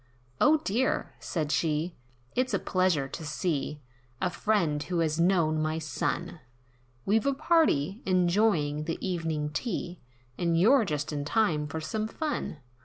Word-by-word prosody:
"O 310 +1 +6
dear!" 255 -1 -1
said 155 -4 -2
she, 155 +2 0 0.4
"It's 255 +1 +1
a - - +3
pleasure 185 -7 +1
to 160 - -7
see 150 -1 -2 0.4
A 180 - 0
friend, 170 -10 +1
who 180 +3 -3
has 160 -1 +1
known 165 -3 +3
my 155 +1 0
son, 160 +2 -3 0.7
We've 220 +5 +2
a 275 - +2
party, 270 - +2
enjoying 175 -5 +2
the 165 - -2
evening 160 -5 -2
tea, 175 0 -3 0.4
And 170 -1 +2
you're 235 +5 +5
just 150 -3 -2
in 145 -1 -2
time 155 -3 +1
for 160 - -4
fun." 220 - -3
170 Hz, 140 wpm, -28 LUFS, 150-210 Hz, 0.7 s, O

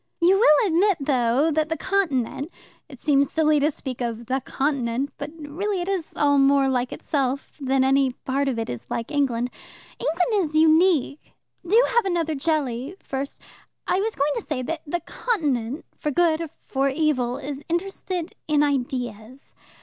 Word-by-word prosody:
"You 370 +3 +4
will 405 -3 +5
admit, 370 +2 +3
though, 270 +2 +2
that 310 +1 0
the 325 - -1
Continent 290 -7 -1 0.4
it 265 -4 -12
seems 280 -2 +2
silly 310 -2 +3
to 290 +2 +3
speak 260 -4 -6
of 235 -1 -3
'the 260 +3 -1
Continent,' 270 -1 -1
but 285 - -4
really 355 +7 -3
it 350 - -3
is 380 -5 -3
all 285 -1 +3
more 275 0 +4
like 250 -1 0
itself 275 -2 -2
than 265 0 +2
any 270 -1 +3
part 275 +2 -2
of 260 -3 -1
it 225 - -2
is 120 0 -7
like 230 +5 -3
England. 250 -4 0 0.5
England 365 +6 +1
is 310 -1 -4
unique. 315 -2 +3 0.3
Do 430 +6 +5
have 475 -2 +2
another 335 -4 0
jelly 280 -1 -1
first. 275 +1 -5 0.4
I 370 - +1
was 435 +2 -1
going 285 +2 +1
to - - -2
say 295 -9 -3
that 320 +5 -3
the 345 +4 -2
Continent, 290 - -2
for 300 - -1
good 325 +1 +2
or 330 - -4 0.2
for 270 0 0
evil, 265 -4 0
is 285 0 -6
interested 360 0 -3
in 295 -1 +3
ideas. 250 -3 -3
285 Hz, 170 wpm, -24 LUFS, 265-330 Hz, 0.5 s, will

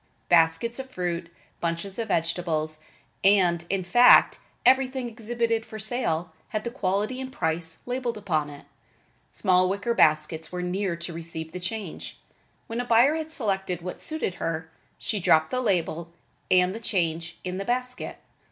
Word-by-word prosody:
Baskets 170 +8 +3
of 265 0 -6
fruit, 175 -6 -3 0.3
bunches 170 +5 -3
of 225 - -2
vegetables 160 -3 -1 0.4
and, 180 -4 +4
in 195 -1 0
fact, 240 +8 +6 0.3
everything 260 0 +3
exhibited 230 0 -1
for 220 -1 -9
sale, 195 -7 -1 0.2
had 215 0 -2
the 235 - -4
quality 210 +2 -1
and 260 0 -6
the - - -19
price 160 0 -1
labeled 245 -2 -2
upon 160 -8 -1
it. 145 -1 -12 0.6
Small 185 -2 +2
wicker 200 +5 -1
baskets 155 -4 +3
were 180 0 -3
near 185 0 -1
to 170 +1 -6
receive 160 -1 -6
the 180 - -6
change. 185 0 -5 0.5
When 230 +2 -3
a - - -5
buyer 245 +5 +5
had 315 0 -4
selected 190 - -1
what 180 - -5
suited 315 - 0
her, 160 0 -3 0.3
she 210 - -2
dropped 160 -3 +3
the 255 - 0
label 170 -6 -1 0.4
and 180 0 +4
the 225 - -6
change 165 -6 -1
in 185 +1 -4
the 195 - -4
basket. 250 +1 -2
185 Hz, 160 wpm, -26 LUFS, 170-235 Hz, 0.6 s, fact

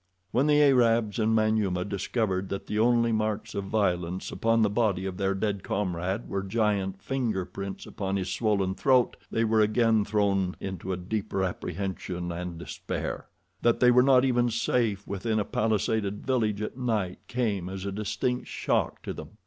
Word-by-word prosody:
When 135 +5 +2
the 150 0 +5
Arabs 115 -6 +3
and 110 0 +2
Manyuema 110 -5 +1
discovered 100 -1 -1
that 100 - -4
the 105 - -2
only 115 0 +3
marks 110 -1 -1
of 100 - -3
violence 90 -4 -1
upon 115 0 +2
the 105 - +3
body 105 -4 +1
of 95 -1 -4
their 95 -1 0
dead 100 0 -1
comrade 95 +2 -2
were 100 - -2
giant 100 -2 0
finger 115 -9 -1
prints 100 +1 -6
upon 95 -1 -3
his 95 -2 -1
swollen 100 -2 +1
throat 130 +2 +3
they 115 - 0
were 110 -1 +3
again 110 0 +3
thrown 100 -3 +1
into 95 -1 -4
deeper 100 +2 -2
apprehension 90 -1 -3
and 85 0 -5
despair. 85 - -5 0.3
That 120 -1 +3
they 125 -1 +6
were 125 +1 +6
not 130 0 +5
even 120 -2 +2
safe 115 -3 0
within 110 +3 -2
a 105 - +1
palisaded 105 -1 0
village 110 -5 0
at 105 - -5
night 110 -8 -1
came 105 -7 -1
as 95 0 -6
a 100 - -2
distinct 105 +5 -2
shock - - -1
to - - -4
them. - - -10
105 Hz, 170 wpm, -27 LUFS, 95-115 Hz, 0.3 s, they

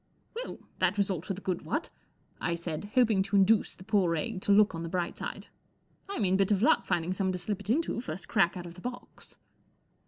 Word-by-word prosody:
' - - -40
Well, 485 - -5 0.2
that 185 +2 +2
was 200 -1 +2
all 175 -5 -2
to 195 - -4
the 195 - -9
good, 185 -3 -2
what? 300 - -3 0.3
" - - -36
I - - +1
said, 170 0 -4
hoping 225 -6 +4
to 200 +1 -1
induce 200 +2 +4
the - - -13
poor 190 -5 +2
egg 190 +4 -3
to 205 - +1
look 205 0 +6
on 165 - -4
the 165 - -4
bright 175 0 -2
side. - - -6 0.3
* - - -39
4 400 - -4
I - - -3
mean 190 -3 +3
bit 195 -1 +2
of 205 +1 +3
luck 315 - +4
finding 175 0 0
someone 190 -1 0
to - - -2
slip 195 +2 -3
it 200 0 -9
into, 275 -1 +1
first 170 -4 -6
crack 175 -1 +2
out 175 - -6
of 170 - -8
the 180 - -13
box." 245 +3 -8
190 Hz, 255 wpm, -30 LUFS, 175-210 Hz, 0.3 s, look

